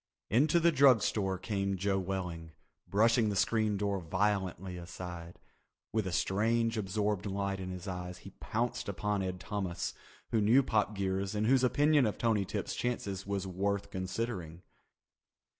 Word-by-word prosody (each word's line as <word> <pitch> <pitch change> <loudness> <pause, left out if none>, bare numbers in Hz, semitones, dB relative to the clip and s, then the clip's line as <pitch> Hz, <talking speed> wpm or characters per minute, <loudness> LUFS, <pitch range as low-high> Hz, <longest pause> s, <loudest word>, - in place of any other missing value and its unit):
Into 150 - +4
the 170 0 +4
drug 135 -6 +6
store 95 -3 0
came 100 -1 -2
Joe 95 +1 +1
Welling, 90 -4 -4 0.3
brushing 115 +2 +3
the 100 - -1
screen 110 +1 +2
door 100 -1 0
violently 95 +1 -1
aside. 85 -1 -8 0.6
With 110 -3 0
a - - -2
strange 115 +6 +1
absorbed 105 -1 -1
light 100 0 -2
in 95 -1 -5
his 90 +1 -7
eyes 90 -1 -5
he - - -8
pounced 120 -1 -2
upon 105 +1 -1
Ed 90 -1 -3
Thomas, 90 -1 -3 0.4
he 115 - +2
who - - +3
knew 120 +7 +5
Pop 105 -3 +1
Geers 95 +1 -1
and 105 +1 +1
whose 130 +2 +4
opinion 145 0 +4
of 105 - -3
Tony 110 -4 +1
Tip's - - -3
chances 100 -6 -3
was 100 -1 -2
worth 100 +2 -2
considering. 95 -3 -4
100 Hz, 160 wpm, -32 LUFS, 95-110 Hz, 0.6 s, drug